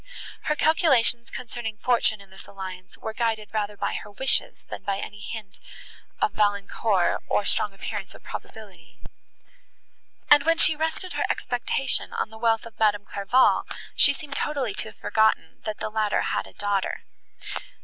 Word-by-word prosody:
Her 300 - +1
calculations 270 -8 +3
concerning 230 -3 -5
fortune 225 -3 +2
in 195 -1 -17
this 190 - -12
alliance 185 -1 -8
were 220 - -5
guided 225 -2 -1
rather 210 -1 -2
by - - -1
her - - -5
wishes, 265 +7 +1
than - - -8
by 200 -1 -1
any 205 +1 -7
hint 205 -1 -8 0.6
of 425 - +2
Valancourt, 205 -1 +1
or 205 - +2
strong 210 - +2
appearance 195 - -6
of - - -15
probability; 215 -5 -10 1.3
and, 290 0 +8
when 330 +2 +3
she 320 - +5
rested 320 +4 -2
her - - 0
expectation 250 +2 0
on 220 - -2
the 220 - -11
wealth 225 -1 +2
of 225 -2 -13
Madame 205 -2 +3
Clairval, 200 +7 +3 0.3
she - - +6
seemed 285 -2 -6
totally 275 -8 -1
to - - -2
have - - -17
forgotten, 220 -7 +1
that 215 -1 -3
the - - -4
latter 215 -1 +1
had - - -1
a - - -15
daughter. 200 -2 -1
220 Hz, 160 wpm, -25 LUFS, 205-245 Hz, 1.3 s, and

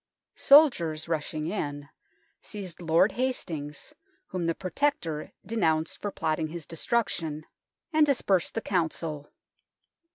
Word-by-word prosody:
Soldiers, 170 - +5
rushing 155 -1 -2
in, 145 -6 -3 0.5
seized 190 -5 -7
Lord 170 +5 +4
Hastings, 170 - -3 0.4
whom 180 -2 -2
the 165 - +1
Protector 185 - -1
denounced 160 -8 0
for 205 - -2
plotting 160 -4 -1
his 165 0 -7
destruction, 165 -5 -2 0.5
and 310 0 +5
dispersed 205 - +2
the 225 - 0
34 - - -31
THE - - -9
TOWER 190 - +3
OF - - +5 0.2
LONDON 155 -2 -3
Council. - - -31
170 Hz, 135 wpm, -28 LUFS, 155-210 Hz, 0.5 s, Soldiers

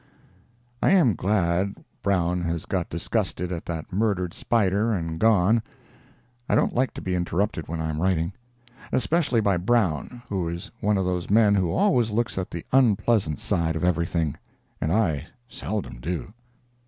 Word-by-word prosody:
I - - +4
am 160 - +5
glad 95 0 +1 0.3
Brown 90 -3 +1
has 85 -1 -2
got 90 -3 -2
disgusted 85 +2 -2
at 85 -2 -5
that 85 +2 -5
murdered 95 -4 0
spider 105 0 +1
and 80 -5 -2
gone; 110 0 +4 0.9
I - - +3
don't - - +2
like 130 +1 0
to - - -7
be 90 - -2
interrupted 90 -1 -1
when 80 +1 -4
I 80 0 -1
am 75 +1 -3
writing—especially 120 - -1
by 100 -3 +2
Brown, 110 - 0
who 95 -4 -2
is 85 +1 -6
one 105 0 +2
of 95 - 0
those 90 -1 -2
men 105 0 +5
who 95 -4 +2
always 175 - +3
looks 110 -3 -1
at 90 - -4
the 85 - -6
unpleasant 110 - +3
side 80 -1 0
of 80 - -3
everything, 85 -3 0 0.5
and 80 - 0
I 85 -7 +1 0.2
seldom 105 - -5
do. 85 +8 -4
95 Hz, 155 wpm, -25 LUFS, 85-110 Hz, 0.9 s, am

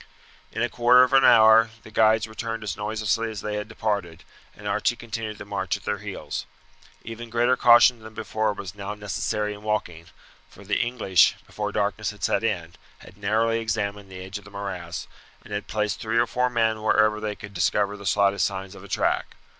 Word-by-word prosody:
In 115 - -2
a - - +2
quarter 120 +2 +5
of 130 - 0
an 135 0 +6
hour 115 -2 +7
the 110 - -13
guides 110 0 +4
returned 115 0 -5
as 100 -3 -3
noiselessly 110 +2 -1
as 110 -3 -6
they 105 0 -3
had 105 0 -4
departed, 105 -7 -3 0.3
and - - -8
Archie - - +1
continued 110 -2 -6
the - - -9
march 100 -2 -2
at - - -17
their - - -2
heels. - - -6 0.6
Even 115 +1 -8
greater 120 +2 +2
caution 120 0 +6
than 110 0 -12
before 110 0 -1
was 95 -3 -7
now 100 0 -6
necessary 105 0 -2
in 105 - -11
walking, 90 -6 -3 0.4
for 100 - -15
the 100 +1 0
English, 115 -7 +3
before 105 -1 -4
darkness 105 0 -1
had 105 0 -10
set - - +1
in, 85 -7 -2 0.2
had 90 - -15
narrowly 110 +3 +1
examined 105 -3 -3
the 95 0 -8
edge 95 +2 -6
of - - -18
the 105 - -13
morass, 95 -4 -6 0.4
and - - -10
had 105 0 -4
placed 105 -1 -1
three 115 +1 -1
or 120 - +4
four 125 +2 0
men 110 -2 +1
wherever 110 0 +3
they 105 -1 -3
could 100 0 -11
discover 100 +3 +1
the 100 -1 -7
slightest 100 -2 +3
signs 95 0 -6
of 100 - -12
a - - -11
track. - - -1
105 Hz, 200 wpm, -25 LUFS, 100-115 Hz, 0.6 s, hour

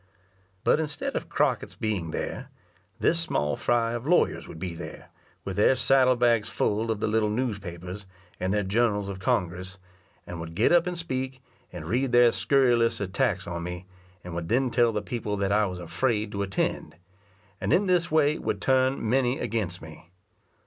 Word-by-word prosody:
But - - +3
instead 150 -2 -3
of - - -3
Crockett's - - 0
being 100 -7 -2
there, - - -4 0.5
this 165 - +2
small 75 - 0
fry 115 -1 +1
of 120 +3 -4
lawyers 175 +2 +2
would - - -9
be 90 0 -4
there, 85 - -9 0.4
with 95 -1 -4
their 105 +6 +5
saddle 130 0 +4
bags 120 -3 +2
full 110 +2 0
of 110 -2 -1
the - - +1
little 105 0 +1
newspapers 100 -5 -4 0.3
and 95 - -1
their 105 0 +1
journals 105 0 +1
of 95 -1 -6
Congress; 90 +1 -1 0.5
and 90 - -7
would 80 0 -7
get 105 - +3
up 175 0 +4
and 180 -1 -3
speak, 130 -5 -4 0.3
and 85 -3 -7
read 125 +8 0
their 120 -1 +7
scurrilous 120 -1 +2
attacks 100 0 0
on 85 -1 -4
me, 90 +1 -6 0.4
and 90 - -7
would 85 -1 -4
then 125 +2 +2
tell 120 -1 +3
the 105 -1 -2
people 105 -2 -3
that 100 0 0
I 105 0 +3
was 90 -1 -5
afraid 105 +5 -1
to 100 - -3
attend; 95 -3 -2 0.7
and - - -1
in 200 - +4
this 180 -2 +2
way 155 -1 +3
would - - -2
turn 130 -2 +2
many 125 +2 +2
against 100 -5 -3
me. 80 +2 -12
110 Hz, 180 wpm, -27 LUFS, 95-130 Hz, 0.7 s, their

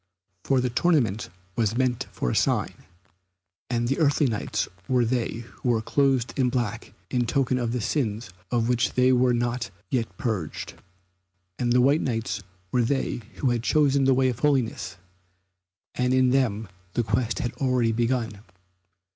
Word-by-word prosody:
For 135 -2 +2
the 125 -1 -1
tournament 125 - +1 0.3
was 115 -1 0
meant 125 -2 0
for - - -2
a - - -2
sign, - - +1 1.0
and 120 -1 0
the 135 - 0
earthly 145 -1 +3
Knights 110 -5 -1 0.2
were 125 -2 +3
they 115 -1 -2
who 125 - -1
were 115 -2 +2
clothed 135 -2 +1
in 125 -1 +3
black 120 -4 -2 0.2
in 120 -2 +1
token 130 +1 +1
of 120 -2 -1
the 125 0 -1
sins 110 -5 -1 0.2
of 115 -2 +1
which 125 -1 +1
they 125 0 +4
were 125 -1 +3
not 120 -2 -1 0.2
yet 115 -8 -1
purged. 105 -10 -3 0.9
And 120 -1 +1
the 125 +1 +5
white 140 +5 +4
Knights 115 -3 -2 0.3
were 125 - +3
they 125 0 -1
who 130 - +1
had 120 -1 0
chosen 140 +1 +3
the 135 -1 +4
way 130 0 +3
of 120 -1 -4
holiness, 125 - 0 1.0
and 125 0 +1
in 130 -1 +4
them 115 -5 +1 0.3
the 120 - +1
quest 120 +1 0
has 120 -6 -2
already 125 -3 +2
begun. 115 -2 -1
125 Hz, 165 wpm, -25 LUFS, 115-130 Hz, 1.0 s, the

